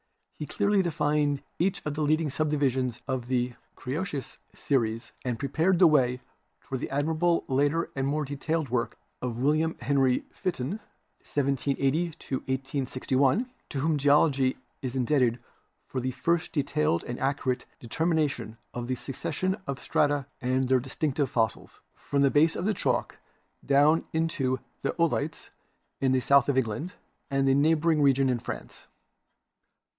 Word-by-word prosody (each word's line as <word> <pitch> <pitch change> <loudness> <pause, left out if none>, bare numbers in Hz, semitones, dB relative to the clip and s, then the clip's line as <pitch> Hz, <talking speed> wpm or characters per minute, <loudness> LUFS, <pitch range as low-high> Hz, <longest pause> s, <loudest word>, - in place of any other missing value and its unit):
He 150 - -6
clearly 200 -1 +2
defined 150 -4 0 0.2
each 185 +3 0
of 150 - -1
the 155 - -3
leading 155 0 +2
subdivisions 135 -5 0
of 130 -3 -2
the 125 -1 0 0.2
Cretaceous 145 0 -4 0.2
series 115 -4 -1
afnd 125 -2 -2
pre 140 - -3
pared 170 +6 +2
the 180 - +7
way 130 -5 +3 0.4
for 130 - -5
the - - -4
admirable 160 +4 +1
later 145 +5 +1
and 135 0 0
more 150 +1 0
detailed 145 +2 -2
work 120 -1 -1 0.2
of 120 -2 -3
William 155 +5 +1
Henry 135 0 +2
Fitton 175 - -3 0.4
(1780 140 +2 0 0.3
1861), 135 - 0 0.2
to 140 - -3
whom 155 0 +1
Geology 140 -2 +3 0.2
is 130 -1 -4
indebted 125 -2 +2 0.5
for 130 - -4
the 130 - -1
first 160 +6 0
detailed 145 - +1
and 120 - -5
accurate 135 -2 -1
determination 140 -5 -1 0.2
of 120 -1 -4
the 130 - 0
succession 150 +8 -2
of 135 -2 -3
strata 145 +1 +1 0.2
and 130 +1 +1
their 130 0 +4
dis 130 +1 -9
tinctive 145 -3 0
fossils, 110 -4 -1
from 140 -1 -1
the 140 -1 +4
base 160 +3 +4
of 180 - -3
the 215 - +2
Chalk - - -1 0.4
down 145 +4 +4
into 150 -6 0 0.2
the - - -1
Oolites, - - 0 0.5
in 135 -1 +2
the 130 - +3
south 140 +3 +4
of 135 - +2
England 130 +8 -1 0.3
and 135 0 +1
the 135 - +5
neighboring 155 +2 +3
region 135 -1 +4
in 125 -2 +1
France. - - -8
140 Hz, 150 wpm, -28 LUFS, 130-155 Hz, 0.5 s, the